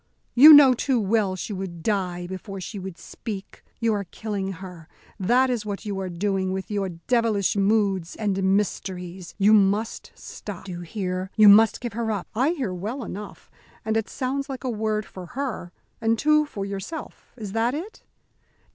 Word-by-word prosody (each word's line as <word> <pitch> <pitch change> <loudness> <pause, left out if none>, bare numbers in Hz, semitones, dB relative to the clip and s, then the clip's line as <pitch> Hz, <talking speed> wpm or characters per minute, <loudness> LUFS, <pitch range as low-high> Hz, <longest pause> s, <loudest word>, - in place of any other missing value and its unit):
You 290 +6 +10
know 290 -3 +9
too 250 0 0
well 205 -2 +1
she 195 +3 -5
would 180 -4 -6
die 180 -4 -1
before 190 +2 -7
she 200 +3 -6
would 185 -2 -7
speak. 205 -4 -8 0.2
You 230 -2 +2
are 200 -1 -2
killing 195 0 -4
her, 180 -3 -10 0.3
that 245 +7 +3
is 235 -4 -1
what 205 -1 -5
you 200 -2 -3
are 190 -1 -3
doing 190 +1 -1
with 190 +2 -4
your 200 -2 -1
devilish 210 +3 0
moods 195 -3 +1
and 200 -3 -1 0.2
mysteries. 185 -3 -4
You 205 +1 +5
must 205 +2 +2
stop. 200 -4 -9
Do 190 - -7
you 175 0 -6
hear? 185 0 -4
You 215 -1 +8
must 220 +2 +6
give 240 -3 -4
her 230 0 -2
up." 200 -4 -3
"I 255 +7 +2
hear 255 - -3
well 215 +9 -4
enough, 205 0 -9 0.3
and 220 0 0
it 225 -1 -1
sounds 275 +2 -3
like 265 -1 -6
a 255 - -1
word 215 -1 -1
for 185 -2 -10
her 250 -10 -3 0.3
and 225 0 +2
two 305 +3 +3
for 200 -8 -5
yourself. 200 +11 -7
Is 210 -4 -6
that 230 +5 0
it?" 365 +9 -7
205 Hz, 180 wpm, -24 LUFS, 190-230 Hz, 0.3 s, You